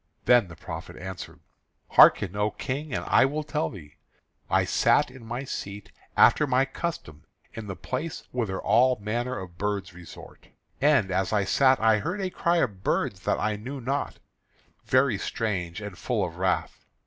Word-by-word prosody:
Then 120 -5 +5
the 85 - -11
prophet - - -8
answered: 95 -1 -8 0.5
"Hearken, 100 -2 +6
O 105 +1 +1
King, 140 +6 -5
and - - -3
I - - +5
will 150 +3 -2
tell 150 +1 -2
thee. 75 -8 -12 0.5
I - - +3
sat - - +3
in 130 -2 -13
my 120 +3 -5
seat, 100 -6 -7 0.3
after 150 - +5
my 130 0 +3
custom, 135 - -6 0.3
in 110 -1 -7
the 95 - -5
place 145 - -5
whither 110 -7 -2
all 125 +3 +4
manner 120 +5 -2
of 90 -2 -9
birds 100 -2 -2
resort. 85 -2 -13 0.3
And 140 -9 +3
as 95 0 0
I 105 -2 +2
sat 130 +6 +3
I 110 -1 +4
heard 180 - -3
a 190 -2 -2
cry 170 0 +1
of 100 - -1
birds 95 -1 0
that - - +1
I 105 -1 -1
knew 130 +6 -7
not, 135 +3 -3 0.7
very 130 -5 +3
strange 95 -6 -3
and 105 -3 -7
full 105 +1 -1
of 85 -1 -8
wrath. 90 0 -1
110 Hz, 170 wpm, -26 LUFS, 95-130 Hz, 0.7 s, Hearken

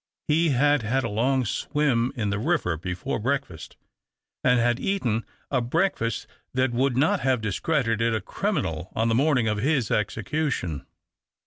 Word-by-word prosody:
He 165 +2 +3
had 145 +1 +3
had 130 +4 0
a - - -2
lono 130 +5 +1
swim 130 0 0
in 105 -5 -1
the 100 - -1
ri\'er 125 - +1
l)efore 90 +5 -4
breakfast, 115 - -3 0.7
and 125 -1 +4
had 120 +1 +2
eaten 120 - -1 0.2
a - - +2
breakftist 120 - 0 0.3
that 130 -1 +2
would 125 +1 +1
not 145 +5 +3
have 130 -1 +1
discredited 115 - 0
a - - 0
criminal 80 -3 -2
on 115 +1 +1
the - - +2
mornimx 125 -3 +3
of 105 - -1
his 135 -2 +1
execution. 105 - -1
120 Hz, 150 wpm, -25 LUFS, 110-140 Hz, 0.7 s, and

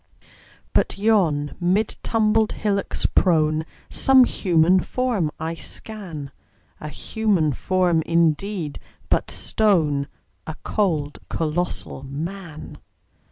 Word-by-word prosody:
But - - +1
yon, 180 -9 +2
mid 190 +5 +1
tumbled 220 -1 +2
hillocks 200 -2 -1
prone, 155 -3 +2 0.2
Some 265 -1 +6
human 180 -5 +3
form 230 -6 -1
I 160 +1 -3
scan 165 -5 -6 0.5
A 150 - -6
human 190 -5 0
form, 180 +2 +1
indeed, 170 0 0 0.3
but - - +1
stone: 155 -10 +1 0.4
A 160 - -5
cold, 155 -8 -1
colossal 165 -2 -2
Man! 160 +4 -7
175 Hz, 95 wpm, -23 LUFS, 155-205 Hz, 0.5 s, Some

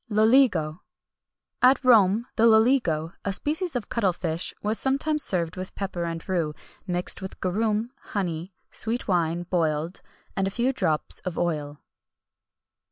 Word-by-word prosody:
LOLIGO. 215 - +3 0.8
At 260 +2 +5
Rome 220 -2 +5
the 230 - +5
loligo, 220 - +3
a 200 - -1
species 310 - -1
of 245 - -2
cuttle 200 -6 +1
fish, 170 -1 -3
was 215 +2 +1
sometimes 295 +3 +1
served 170 -2 -1
with 185 0 -6
pepper 185 -3 -3
and 165 +1 -5
rue, 165 -5 -1 0.3
mixed 180 +1 0
with 190 - -8
garum, 215 +5 -1
honey, 180 -2 -4 0.2
sweet 230 +2 0
wine 170 -2 +1
boiled, 165 -1 -1 0.3
and 195 0 0
a - - 0
few 240 +6 0
drops 155 -11 -1
of 180 -3 -6
oil. 150 -4 -2
190 Hz, 140 wpm, -25 LUFS, 170-230 Hz, 0.8 s, At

